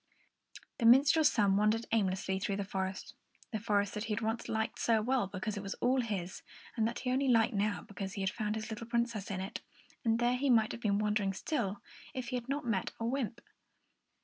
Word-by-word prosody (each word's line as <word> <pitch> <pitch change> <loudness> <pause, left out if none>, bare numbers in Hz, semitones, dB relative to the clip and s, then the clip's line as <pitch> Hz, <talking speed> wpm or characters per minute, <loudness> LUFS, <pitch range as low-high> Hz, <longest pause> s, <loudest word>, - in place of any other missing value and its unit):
The 230 - +4
minstrel's 285 +6 +6
son 200 -3 +3
wandered 215 +2 +2
aimlessly 190 -3 +1
through 200 0 -1
the 200 - -2
forest, 190 -1 -4 0.4
the 220 - -2
forest 205 -2 +1
that 210 +1 -3
he 220 - -1
had 220 - -2
once 225 +1 -2
liked 220 0 -1
so 225 -2 +3
well 245 -1 +1
because 200 +2 -4
it - - -3
was 195 0 -5
all 255 +1 +2
his, 195 -6 -4 0.3
and 220 -1 +2
that 235 - -3
he 250 - -1
only 270 +2 +1
liked 230 -1 +4
now 205 -3 0
because 195 -1 -6
he 195 - -4
had 190 0 +1
found 215 -2 -2
his 220 +1 -5
little 220 +1 -6
Princess 235 -3 -1
in 190 -2 -3
it; 190 - -5 0.4
and 225 -2 +3
there 240 +1 +2
he 280 +2 0
might 225 -3 +4
have 235 - -7
been 200 -3 +2
wandering 210 -2 +1
still, 205 -3 -2 0.3
if 255 -2 -4
he - - -2
had 245 +1 -4
not 285 +1 0
suddenly 225 -5 +1
met 185 - -3
a 230 - -2
wymp. 235 -2 -2
220 Hz, 225 wpm, -33 LUFS, 200-235 Hz, 0.4 s, minstrel's